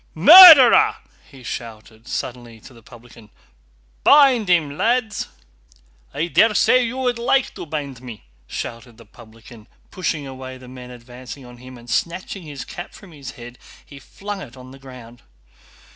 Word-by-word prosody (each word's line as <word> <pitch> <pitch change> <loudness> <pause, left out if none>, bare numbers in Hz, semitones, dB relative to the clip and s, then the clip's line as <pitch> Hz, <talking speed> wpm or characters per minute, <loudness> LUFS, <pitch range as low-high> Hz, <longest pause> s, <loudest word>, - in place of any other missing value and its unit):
"Murderer!" 300 - +8 0.3
he 135 -3 -17
shouted 115 -1 -10
suddenly 120 -3 -7
to 130 - -17
the 115 - -18
publican. 115 -1 -18 0.7
"Bind 265 -8 +4
him, 155 -5 0
lads!" 230 +3 -2 0.8
"I 155 - -3
daresay 225 +7 +2
you 240 +2 -5
would 250 -2 -3
like 260 +2 -1
to - - -10
bind 140 -5 -7
me!" 120 -4 -12 0.2
shouted 115 - -9
the 115 - -17
publican, 110 +1 -18 0.2
pushing 165 -5 -4
away 130 -1 -10
the 130 0 -16
men 125 0 -12
advancing 125 +2 -13
on 125 0 -15
him, 130 +1 -14
and 120 0 -17
snatching 185 +8 -4
his 145 -5 -10
cap 175 - -10
from 195 -4 -16
his 140 -4 -11
head 120 +1 -13 0.3
he 140 - -15
flung 200 +7 -9
it 130 -4 -13
on 130 0 -14
the 135 - -15
ground. 125 -3 -15
130 Hz, 155 wpm, -19 LUFS, 120-185 Hz, 0.8 s, Murderer